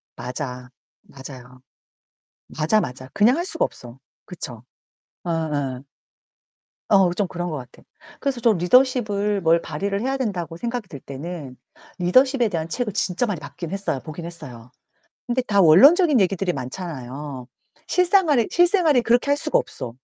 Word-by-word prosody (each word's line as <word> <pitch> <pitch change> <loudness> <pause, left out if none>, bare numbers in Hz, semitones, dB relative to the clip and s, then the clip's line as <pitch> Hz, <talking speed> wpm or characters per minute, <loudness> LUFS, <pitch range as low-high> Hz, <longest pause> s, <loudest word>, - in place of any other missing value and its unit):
맞아. 125 0 -6 0.3
맞아요. 130 -2 -11 1.0
맞아, 160 +8 +3
맞아 130 -5 -6
그냥 225 +6 +4
할 345 - -1
수가 335 -3 0
없어. 120 +1 -8 0.3
그쵸? 125 -10 -8 0.6
어예. 145 -6 -2 1.1
어 195 -3 +4
좀 200 +1 -1
그런 175 -1 -4
것 155 - -4
같아. 125 -2 -12 0.4
그래서 275 -4 -2
좀 230 -4 +3
리더십을 210 0 +2
뭘 165 0 +3
발휘를 200 +6 -3
해야 265 +3 -1
된다고 175 - -3
생각이 235 +1 -4
들 145 -7 -9
때는 140 0 -8 0.4
리더십에 255 +7 +3
대한 165 -4 -3
책을 235 +1 -2
진짜 190 +3 0
많이 205 -8 -3
봤긴 165 +1 -8
했어요 195 -8 -2
보긴 165 +1 -8
했어요. 125 -8 -9 0.6
근데 250 +1 +1
다 205 -5 +2
원론적인 280 - +7
얘기들이 190 -1 +1
많잖아요. 135 -3 -6 0.4
실생활에, 345 - +3
실생활에 345 -6 +4
그렇게 240 +4 +2
할 285 - +3
수가 305 0 +1
없어. 115 - -6
180 Hz, 310 characters per minute, -22 LUFS, 145-240 Hz, 1.1 s, 원론적인